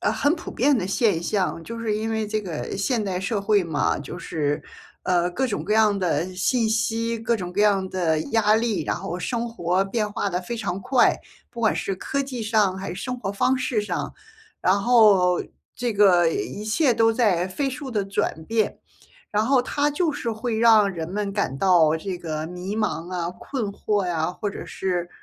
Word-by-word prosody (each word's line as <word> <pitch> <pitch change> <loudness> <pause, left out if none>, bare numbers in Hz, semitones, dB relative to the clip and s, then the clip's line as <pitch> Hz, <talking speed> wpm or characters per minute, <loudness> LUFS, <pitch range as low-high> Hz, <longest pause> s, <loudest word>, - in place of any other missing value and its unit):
呃， - - +1
很 290 +3 +2
普 345 - -8
遍 280 +3 +2
的 190 -6 -1
现 195 -4 +1
象。 185 -3 -1
就 230 0 -7
是 220 -2 -1
因 220 +1 -2
为 220 -1 -1
这 215 +1 -1
个 170 -5 -5
现 225 +4 0
代 190 -3 -2
社 200 +3 -1
会 200 -2 +2
嘛， 155 -3 0
就 140 +5 -7
是， 145 -4 -2 0.4
呃， 175 -1 +2
各 260 +9 -1
种 215 - -3
各 210 - -1
样 215 -2 +4
的 180 0 -1
信 225 +5 +1
息， 225 +1 0
各 225 +1 0
种 180 -5 -4
各 200 +3 +1
样 195 -3 +3
的 170 -4 0
压 215 -2 +4
力， 225 -7 0
然 - - 0
后 175 - -5
生 235 +5 -2
活 185 -4 0
变 210 +1 -1
化 200 - -1
得 180 - -1
非 235 - -5
常 210 -5 -3
快， 250 +6 +3 0.3
不 235 - -8
管 220 - +3
是 195 - -2
科 275 +8 -2
技 255 -4 -5
上 210 -3 +2
还 190 0 -5
是 - - -5
生 250 0 -4
活 195 -5 -3
方 255 +6 +2
式 255 -4 0
上， 190 -4 -3 0.5
然 190 +2 +3
后 200 -5 +5 0.3
这 245 -2 -2
个 185 -4 +5
一 200 +5 -3
切 245 +6 +2
都 225 0 +3
在 205 -7 +2
飞 275 +8 -2
速 265 +1 -6
地 210 -4 -1
转 195 -5 -2
变。 220 +2 0 0.5
然 210 +1 +1
后 260 +2 +4
它 290 +4 0
就 310 +1 0
是 235 - -3
会 225 +1 -3
让 220 -3 +6
人 165 -2 -5
们 205 -1 -2
感 195 -10 -1
到 165 -4 +4
这 185 +3 -4
个 155 -2 -4
迷 180 +4 -5
茫 185 -5 -2
啊、 170 -2 -2
困 265 -5 -4
惑 205 -1 -1
呀， 165 -2 0
或 205 +3 -4
者 200 - -7
是， 180 -2 -2
205 Hz, 220 characters per minute, -24 LUFS, 180-230 Hz, 0.5 s, 让